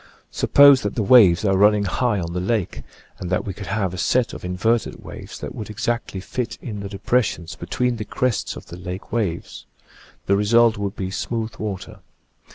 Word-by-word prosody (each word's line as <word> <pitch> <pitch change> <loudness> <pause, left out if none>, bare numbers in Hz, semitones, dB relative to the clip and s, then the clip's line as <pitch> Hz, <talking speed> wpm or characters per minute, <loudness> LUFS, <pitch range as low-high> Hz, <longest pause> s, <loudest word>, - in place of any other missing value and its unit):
Suppose 140 -2 +6
that 105 - -3
the 115 - 0
waves 100 -4 +6
are 95 -1 +3
running 105 +1 +4
high 105 +2 0
on 85 -1 -4
the 90 - -2
lake, 100 0 -1 0.4
and 90 - -5
that 90 - 0
we 95 - -4
could 95 0 -9
have 95 -2 -1
a 90 - -5
set 120 +7 +1
of - - -9
inverted 95 +6 0
waves - - -9
that - - -6
would 110 - -7
exactly 110 -1 -3
fit 120 +5 -4
in 105 -5 -6
the 100 -1 -6
depressions 100 -5 -1
between 120 +9 -2
the 105 - -5
crests 125 0 -1
of - - -10
the 85 - -10
lake 90 +1 -7
waves: 100 -8 -3 0.6
the 100 - +3
result 115 +3 +4
would 100 0 -3
be 95 -1 -4
smooth 115 +2 -3
water. 100 -3 -6
105 Hz, 190 wpm, -22 LUFS, 95-115 Hz, 0.6 s, Suppose